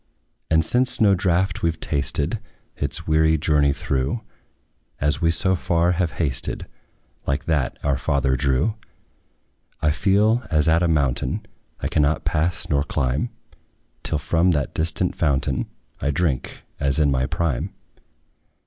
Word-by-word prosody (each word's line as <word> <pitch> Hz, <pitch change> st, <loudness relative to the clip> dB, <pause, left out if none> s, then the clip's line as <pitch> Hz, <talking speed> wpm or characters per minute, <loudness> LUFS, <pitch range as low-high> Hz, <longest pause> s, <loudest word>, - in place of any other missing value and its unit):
And 80 Hz, 0 st, +3 dB
since 125 Hz, +7 st, +1 dB
no 105 Hz, -3 st, +5 dB
draught 95 Hz, 0 st, +1 dB
we 85 Hz, -, +2 dB
've 80 Hz, -1 st, -5 dB
tasted, 70 Hz, -1 st, 0 dB, 0.4 s
Its 70 Hz, +4 st, -2 dB
weary 80 Hz, 0 st, +3 dB
journey 75 Hz, -2 st, +3 dB
through, 70 Hz, -, -1 dB, 0.8 s
As 75 Hz, 0 st, 0 dB
we 80 Hz, -, +3 dB
so 95 Hz, +3 st, +3 dB
far 85 Hz, -1 st, +1 dB
have 85 Hz, -1 st, 0 dB
hasted, 70 Hz, -7 st, -2 dB, 0.6 s
Like 70 Hz, +2 st, -1 dB
that 75 Hz, -5 st, 0 dB
our 70 Hz, -2 st, +1 dB
father 70 Hz, -1 st, +1 dB
drew; 70 Hz, -, +1 dB, 1.0 s
I 75 Hz, -, +2 dB
feel, 105 Hz, +7 st, +3 dB
as 75 Hz, 0 st, +2 dB
at 80 Hz, +1 st, +4 dB
a 85 Hz, -, +3 dB
mountain, 70 Hz, -5 st, 0 dB, 0.4 s
I -, -, -1 dB
cannot 75 Hz, 0 st, +1 dB
pass 80 Hz, +3 st, 0 dB
nor 70 Hz, -1 st, +1 dB
climb, 65 Hz, -1 st, -1 dB, 0.7 s
Till 80 Hz, -, -1 dB
from 80 Hz, +4 st, +2 dB
that 70 Hz, -3 st, -1 dB
distant 80 Hz, +3 st, 0 dB
fountain 70 Hz, -4 st, 0 dB, 0.3 s
I 70 Hz, -, -1 dB
drink, 75 Hz, -4 st, -1 dB, 0.2 s
as 70 Hz, -1 st, +1 dB
in 75 Hz, -2 st, +3 dB
my 65 Hz, -1 st, +1 dB
prime. 80 Hz, -8 st, -1 dB
80 Hz, 140 wpm, -23 LUFS, 70-85 Hz, 1.0 s, no